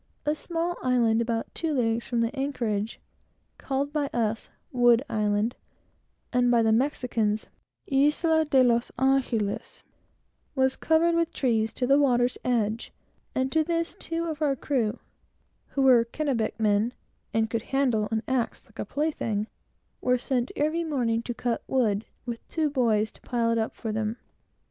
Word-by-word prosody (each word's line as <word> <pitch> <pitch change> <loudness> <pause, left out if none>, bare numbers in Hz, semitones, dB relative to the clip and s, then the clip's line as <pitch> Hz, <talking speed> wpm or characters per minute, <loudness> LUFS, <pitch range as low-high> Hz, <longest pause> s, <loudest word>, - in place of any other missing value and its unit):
A 300 - +2
small 340 +2 -3
island, 235 -3 +3
situated - - +2
about 230 -1 -2
two 325 -2 -1
leagues 230 -2 0
from 235 -1 0
the 230 +4 -1
anchorage, 235 -6 -2 0.6
called 280 +1 -2
by 295 -2 0
us 225 -4 -2 0.2
"Wood 245 0 +4
Island," 210 +1 0 0.8
and 245 0 +3
by 235 -1 +4
the 220 - +3 0.2
Spaniards 220 -5 -1 0.8
"Isle 320 -1 +3
de 270 -3 +4
los 235 -1 +2
Angelos," 255 -6 0 0.7
was 265 -1 +2
covered 325 +1 +3
with 335 -1 +1
trees 225 -4 +1
to 250 - -1
the 275 +3 +5
water's 245 -3 +2
edge; 230 -2 0 0.4
and 260 0 0
to 320 +1 +3
this, 335 +1 -1
two 330 0 -4
of 315 -2 -4
our 285 -3 +2
crew, 245 -6 -1 0.7
who 275 - -1
were 250 -3 +6
Kennebec 235 -4 -2
men, 215 +2 +2 0.4
and 225 0 +1
could 225 0 -2
handle 245 -5 +1
an 220 0 -1
axe 260 -1 -1
like 225 -4 -20
a - - -2
plaything, 230 -6 -1 0.6
were 250 0 +3
sent 250 0 -1
every 310 +3 0
morning 245 -8 0
to 240 - -4
cut 240 0 -1
wood, 220 -5 +1 0.2
with 235 -2 -4
two 310 -3 0
boys 220 -6 +2
to - - -20
pile 235 -2 0
it 230 - +1
up 220 - -2
for 225 - -4
them. 215 +1 -2
245 Hz, 160 wpm, -27 LUFS, 225-280 Hz, 0.8 s, were